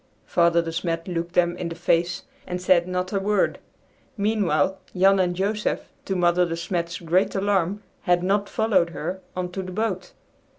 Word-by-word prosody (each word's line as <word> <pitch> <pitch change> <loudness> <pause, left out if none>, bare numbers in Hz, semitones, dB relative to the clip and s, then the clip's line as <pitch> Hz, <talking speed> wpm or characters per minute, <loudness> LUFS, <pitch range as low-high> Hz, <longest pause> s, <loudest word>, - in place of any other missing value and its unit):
'" - - -38
Father 170 -1 +4
De 165 - -4
Smet 165 0 -2
looked 170 -1 -3
them 175 -1 +3
in 170 - -3
the 165 - -6
face 175 +1 +1 0.2
and 180 0 -3
said 180 -1 +3
not 185 +1 -2
a 195 - +2
word. 205 0 +1 0.6
Meanwhile 200 -3 +1 0.2
Jan 195 +1 +5
and 180 -1 +1
Joseph, 210 +3 -1 0.2
to 195 - -1
Mother 175 0 +3
De 165 -1 -2
Smet's 170 0 -2
great 180 +5 +1
alarm, 195 0 0 0.2
had 175 -1 +3
not 200 +2 +1
followed 200 -6 +2
her, 185 +1 -4
on 180 -1 -3
to 190 - -4
the 185 0 -7
boat. 190 -2 -2
180 Hz, 180 wpm, -24 LUFS, 170-195 Hz, 0.6 s, Jan